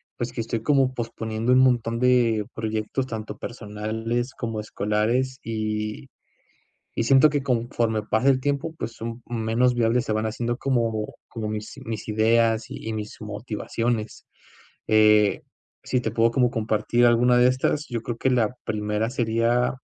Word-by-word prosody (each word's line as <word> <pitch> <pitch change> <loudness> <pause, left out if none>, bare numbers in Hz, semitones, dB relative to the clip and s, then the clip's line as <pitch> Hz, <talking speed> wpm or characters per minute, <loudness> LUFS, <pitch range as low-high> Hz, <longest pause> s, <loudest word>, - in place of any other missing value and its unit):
pues, 120 -1 -3
que - - -7
estoy 115 0 -3
como 135 -1 +3
posponiendo 115 -1 -2
un 130 - +6
montón 120 -3 +2
de 120 -4 +3
proyectos, 110 +4 -2
tanto 110 -3 -6
personales 110 +2 -4
como 115 -3 -4
escolares. 110 +5 -1
Y 110 - -3 0.9
y 115 - 0
siento 135 +5 +6
que 145 -2 -1
conforme 115 -3 0
pasa 110 +4 0
el 130 -1 +3
tiempo, 145 +3 -1
pues 115 +1 -5
son 115 +1 -6
menos 120 +1 +1
viables. 120 +1 +2
Se 110 - -1
van 110 +1 0
haciendo 120 +2 -2
como 115 -5 -1
como 110 -2 -5
mis 110 +4 -5
mis 110 -2 -5
ideas, 110 +1 +2
y 110 - -6
y - - -2
mis 105 -1 -6
motivaciones. 110 +1 -3 0.6
Eh, 105 -1 +4 0.4
si 125 - 0
te 110 - -2
puedo 115 0 +3
como 125 0 +2
compartir 115 +1 +1
alguna 120 +1 +4
de 125 - +6
estas, 130 +4 0
yo 115 -2 -3
creo, 120 - -4
que 130 - +1
la 125 -2 +1
primera 105 +1 -1
sería 120 0 +1
115 Hz, 155 wpm, -24 LUFS, 110-125 Hz, 0.9 s, un